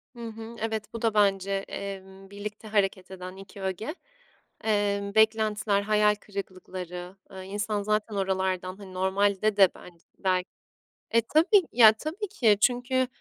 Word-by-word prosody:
Hı 235 -1 -6
hı, 225 +1 -8
evet. 220 0 -3
Bu 230 - -5
da 225 -2 +2
bence, 195 -2 +2 0.2
emm, 195 -1 -7
birlikte 210 +2 -7
hareket 195 -3 0
eden 185 0 -8
2 195 +2 -13
öge. 195 - -4 0.7
Emm, 200 -1 0
beklentiler, 215 -2 +3
hayal 210 0 +3
kırıklıkları, 185 -3 -7 0.2
ııı, 190 -1 -8
insan 205 +1 -2
zaten 215 0 -1
oralardan, 190 -1 -1
hani, 190 -2 -11
normalde 200 +2 +1
de 195 -2 +7
ben 175 -1 -14 0.2
bel 185 -2 +1 0.7
E, 230 - +4
tabii. 330 - +4
Ya 220 -3 +8
tabii 330 - -5
ki 230 - +3
çünkü, 250 +2 +2
205 Hz, 140 wpm, -27 LUFS, 190-220 Hz, 0.7 s, Ya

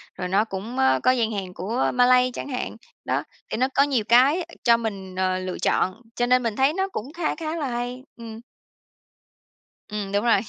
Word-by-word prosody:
rồi 180 - -4
nó 200 +4 +2
cũng, 215 +4 -6
ơ, 130 0 +3
có 255 - +5
gian 230 -3 +1
hàng 190 -3 -4
của 215 +9 -1
Malay 250 0 +4
chẳng - - -5
hạn. 250 -3 -4 0.3
Đó, - - 0 0.3
thì - - -2
nó 260 +2 +2
có 280 - +6
nhiều 265 -6 +1
cái 275 +9 +5 0.2
cho 235 -1 +5
mình, 195 -5 -5
ờ, 185 0 0
lựa 185 -1 -4
chọn 185 +6 0
cho 245 - +1
nên 250 0 +3
mình 225 -2 -1
thấy 270 +3 +3
nó 385 +1 0
cũng 275 - -6
khá 340 -2 -1
khá 320 0 -4
là 295 -4 -2
hay, 245 +1 -4
ừm. 225 -1 -9 1.5
Ừm, 205 -2 -4
đúng 205 +3 0
rồi. 230 -4 +5
235 Hz, 205 wpm, -24 LUFS, 200-255 Hz, 1.5 s, có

